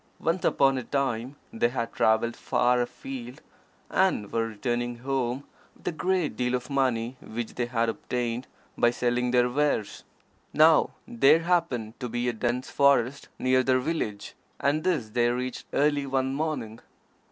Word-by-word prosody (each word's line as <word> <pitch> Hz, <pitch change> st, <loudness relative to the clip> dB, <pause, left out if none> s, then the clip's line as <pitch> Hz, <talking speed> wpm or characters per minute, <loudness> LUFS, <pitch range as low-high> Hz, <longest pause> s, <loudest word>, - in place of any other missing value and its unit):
Once 170 Hz, +2 st, 0 dB
upon 135 Hz, -1 st, +3 dB
a -, -, -6 dB
time 135 Hz, -1 st, -2 dB, 0.2 s
they 120 Hz, +1 st, +2 dB
had 115 Hz, -2 st, -3 dB
travelled 110 Hz, +1 st, +2 dB
far 125 Hz, 0 st, +2 dB
afield, 125 Hz, +1 st, -6 dB, 0.5 s
and 185 Hz, -, +1 dB
were 115 Hz, 0 st, +1 dB
returning 120 Hz, +2 st, -2 dB
home 130 Hz, +1 st, -2 dB, 0.3 s
with -, -, -13 dB
a -, -, +2 dB
great 180 Hz, 0 st, 0 dB
deal 125 Hz, 0 st, 0 dB
of 125 Hz, +2 st, -5 dB
money 130 Hz, -2 st, 0 dB
which 115 Hz, 0 st, -5 dB
they 120 Hz, -1 st, -2 dB
had 115 Hz, -1 st, 0 dB
obtained 120 Hz, +1 st, -3 dB, 0.3 s
by 120 Hz, -, +4 dB
selling 120 Hz, +1 st, 0 dB
their 125 Hz, 0 st, +4 dB
wares. 135 Hz, -5 st, -1 dB, 0.5 s
Now -, -, +5 dB, 0.2 s
there 135 Hz, +7 st, +4 dB
happened 160 Hz, -11 st, 0 dB
to 125 Hz, -, -4 dB
be 120 Hz, +1 st, -2 dB
a 120 Hz, -, +1 dB
dense 120 Hz, +3 st, -2 dB
forest 140 Hz, -1 st, +2 dB
near 130 Hz, 0 st, +3 dB
their 130 Hz, 0 st, +2 dB
village, 120 Hz, -8 st, -3 dB, 0.3 s
and 145 Hz, +3 st, +1 dB
this 150 Hz, -12 st, 0 dB
they 120 Hz, +2 st, +2 dB
reached 125 Hz, +1 st, -3 dB
early 145 Hz, -1 st, +1 dB
one 135 Hz, 0 st, 0 dB
morning. 135 Hz, -7 st, -3 dB
125 Hz, 155 wpm, -27 LUFS, 120-140 Hz, 0.5 s, Now